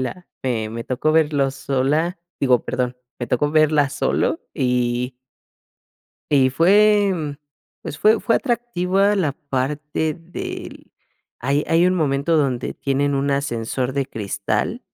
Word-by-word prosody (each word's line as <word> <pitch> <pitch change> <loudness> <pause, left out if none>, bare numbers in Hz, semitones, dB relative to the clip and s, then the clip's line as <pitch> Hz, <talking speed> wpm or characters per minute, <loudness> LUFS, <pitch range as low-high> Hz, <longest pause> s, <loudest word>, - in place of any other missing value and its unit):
la 175 +8 -5 0.4
me 115 +1 -6
tocó 130 +4 0
verlo 150 -4 +2
sola, 140 +6 0 0.2
digo 130 -3 +3
perdón, 125 0 -2 0.2
me 120 - -3
tocó 145 +5 +1
verla 155 -2 +3
solo, 145 - 0
y 125 -1 0 1.2
y 135 -3 +4
fue 190 -1 +3 0.5
pues, 145 - -6
fue 215 +4 +4
fue 230 - +1
atractiva 205 -5 +1
la 170 -8 0
parte 150 +1 -2
del 165 +2 -8 0.5
hay 140 +4 0
hay 165 +2 +4
un 185 - +2
momento 150 -1 +1
donde 130 -5 0
tienen 140 +1 0
un 140 +1 0
ascensor 130 -2 -1
de 135 -1 -1
cristal 100 -5 -2
145 Hz, 125 wpm, -21 LUFS, 130-170 Hz, 1.2 s, y